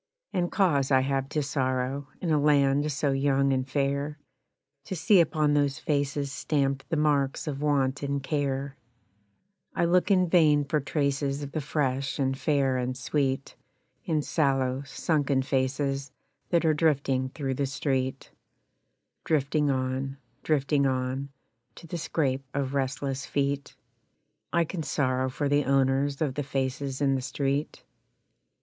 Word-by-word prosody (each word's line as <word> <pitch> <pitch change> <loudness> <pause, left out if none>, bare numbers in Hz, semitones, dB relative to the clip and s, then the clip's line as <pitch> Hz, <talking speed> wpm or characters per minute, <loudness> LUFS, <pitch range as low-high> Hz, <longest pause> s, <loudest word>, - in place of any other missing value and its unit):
And 175 -2 0
cause 145 -9 +2
I 130 -2 +5
have 135 0 -1
to 150 -1 -1
sorrow, 130 0 -1
in 170 - -1
a 150 - +3
land 145 0 +3
so 140 0 0
young 135 0 +2
and 130 0 -1
fair, 140 +2 -1 0.7
To 190 - -4
see 180 +4 +4
upon 155 -2 +1
those 145 -1 +2
faces 145 -1 -1
stamped 140 -2 -1
the 165 - 0
marks 145 -3 +1
of 145 -2 -4
Want 140 -2 +1
and 140 -1 -2
Care; 140 -1 -2 1.0
I - - +2
look 180 +3 +3
in 185 -2 +4
vain 155 -4 +4
for 150 +2 +1
traces 140 0 -1
of 140 - -6
the 155 - -2
fresh 135 -2 -1
and 135 -1 0
fair 135 -2 +1
and 125 0 -2
sweet 135 0 -1 0.5
In 155 -2 0
sallow, 135 -4 +1
sunken 140 -1 0
faces 135 +1 -1 0.4
that 170 -1 +2
are 155 - +4
drifting 140 -4 +1
through 135 -1 -3
the 140 +1 -1
street 135 -1 -2 0.9
Drifting 150 -1 +1
on, 130 +1 -1 0.2
drifting 140 -2 +2
on, 130 +1 -2 0.5
To - - -12
the 170 +1 -5
scrape 135 -4 -1
of 140 -1 -1
restless 135 0 -2
feet; 140 0 -1 0.8
I 170 - +3
can 165 +1 -4
sorrow 130 -3 0
for 145 +2 -2
the 145 +1 +2
owners 135 +2 +2
of 140 -4 -1
the 145 - -2
faces 135 0 -3
in 140 -1 +3
the 135 - 0
street. 140 +2 -2
140 Hz, 145 wpm, -27 LUFS, 135-150 Hz, 1.0 s, I